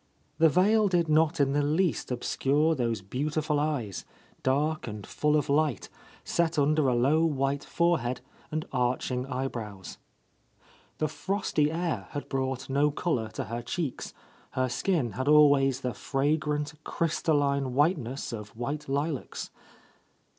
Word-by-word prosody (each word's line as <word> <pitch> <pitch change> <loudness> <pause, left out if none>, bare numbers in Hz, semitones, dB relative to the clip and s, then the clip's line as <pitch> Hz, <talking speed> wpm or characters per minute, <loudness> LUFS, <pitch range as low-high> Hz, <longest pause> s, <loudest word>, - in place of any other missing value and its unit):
The 165 0 +6
veil 205 +6 +4
did 175 -3 +2
not 155 +1 +3
in 140 -1 +3
the 145 - +2
least 155 +4 +1
obscure 140 +5 +1
those 115 -8 -1
beauti 150 +9 -2
ful 150 -1 +1
eyes, 140 -10 -2 0.4
dark 150 +4 0
and 105 -3 -6
full 150 0 +1
of 150 - -1
light, 145 -4 +1 0.3
set 170 -1 0
under 150 0 +3
a 125 - +2
low 140 +7 +3
white 140 -3 0
forehead 160 -8 0 0.3
and 155 0 -3
arching 125 0 0
eyebrows. 115 -7 -5 1.0
The 155 - 0
frosty 155 -1 0
air 170 0 -2
had 145 - -5
brought 130 -1 -2
no 140 +2 +2
colour 140 -7 -1
to - - -3
her 115 +1 -4
cheeks, 140 +3 -4 0.2
— - - -29
her 130 0 0
skin 135 - 0
had 130 +7 -4
always 145 -3 +5
the 125 -1 -2
fragrant, 150 +1 -1
crystalline 140 -5 0
white 155 +5 +3
ness 130 +1 -5
of 105 -1 -8
white 145 +4 -4
lilacs. 145 +1 -3
145 Hz, 145 wpm, -28 LUFS, 130-155 Hz, 1.0 s, The